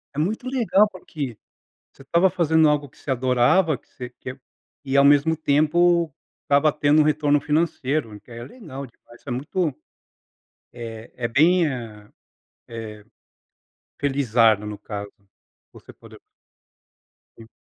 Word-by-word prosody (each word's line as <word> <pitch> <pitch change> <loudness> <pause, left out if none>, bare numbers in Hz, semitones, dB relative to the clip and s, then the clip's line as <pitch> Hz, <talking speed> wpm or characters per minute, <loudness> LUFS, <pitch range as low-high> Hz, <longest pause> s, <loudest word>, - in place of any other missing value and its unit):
É - - -3
muito 215 +10 -2
legal. 225 -5 +3
Porque 145 - -7 0.5
você - - -17
estava 170 +7 +3
fazendo 160 -3 +3
algo 150 -1 0
que - - -26
você - - -11
adorava 130 +6 +2
que - - -33
você 125 -1 -9
quer 130 +1 -8 0.5
e 135 0 -2
ao 140 - +6
mesmo 145 +3 +4
tempo 160 +2 +2 0.3
estava 145 +2 +3
tendo 150 +1 +3
um - - +4
retorno 150 -1 +2
financeiro, 150 -7 -1
que 120 - -19
aí 115 - -8
é 120 - -7
legal 140 - -9
demais. 120 0 -20
Isso 140 - -10
é - - -3
muito 150 +4 -2 1.0
eh, 115 -1 -9
é 120 -1 -2
bem, 165 +7 +3
eh 110 -6 -7 0.6
eh, 110 -2 -8 0.9
felizardo 115 -7 +2
no 105 - -6
caso, 100 -1 -7 0.6
você - - -14
poder - - -16 1.2
Sim. 115 - -13
140 Hz, 145 wpm, -23 LUFS, 120-160 Hz, 1.2 s, ao